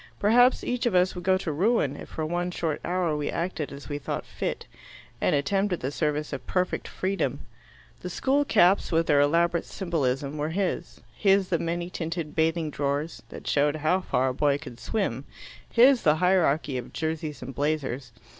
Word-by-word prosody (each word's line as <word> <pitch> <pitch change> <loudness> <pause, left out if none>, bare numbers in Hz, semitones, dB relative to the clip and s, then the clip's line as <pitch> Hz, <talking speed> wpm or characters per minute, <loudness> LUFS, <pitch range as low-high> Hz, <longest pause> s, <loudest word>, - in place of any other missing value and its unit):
Perhaps 245 +5 +4
each 245 0 -1
of 215 - 0
us 180 +1 +3
would 180 - -7
go 185 +1 +3
to 185 -4 -3
ruin 165 - +1
if - - -10
for 160 - -3
one 175 +2 -1
short 165 -3 -2
hour 175 -3 0
we 150 -1 -2
acted 170 -3 -3
as 140 0 -9
we 145 -1 -4
thought - - -4
fit, - - -4 0.6
and - - +3
attempted 195 +4 0
the 130 - -2
service 150 -1 -1
of 140 - -6
perfect 180 -1 -1
freedom. 185 -8 -2 0.6
The 180 - -6
school 270 +10 +1
caps, 200 -7 +3
with 165 0 +2
their 145 -3 +4
elaborate 170 +3 +2
symbolism, 145 -5 -2
were 150 +1 -1
his; 190 +2 -2
his 195 -2 +3
the 170 -3 +1
many 170 +2 -3
tinted 165 -2 -4
bathing 160 -1 +1
drawers, 145 +3 -2
that - - -10
showed 145 +1 +2
how 155 +5 +1
far 130 -7 +1
a - - -2
boy 140 +1 +2
could 120 -4 -10
swim; 140 - -2 0.5
his 255 +2 +6
the 150 -1 +4
hierarchy 160 -6 +2
of 120 - -10
jerseys 155 -4 -3
and 135 +2 -7
blazers. 140 -3 -2
160 Hz, 185 wpm, -26 LUFS, 145-185 Hz, 0.6 s, his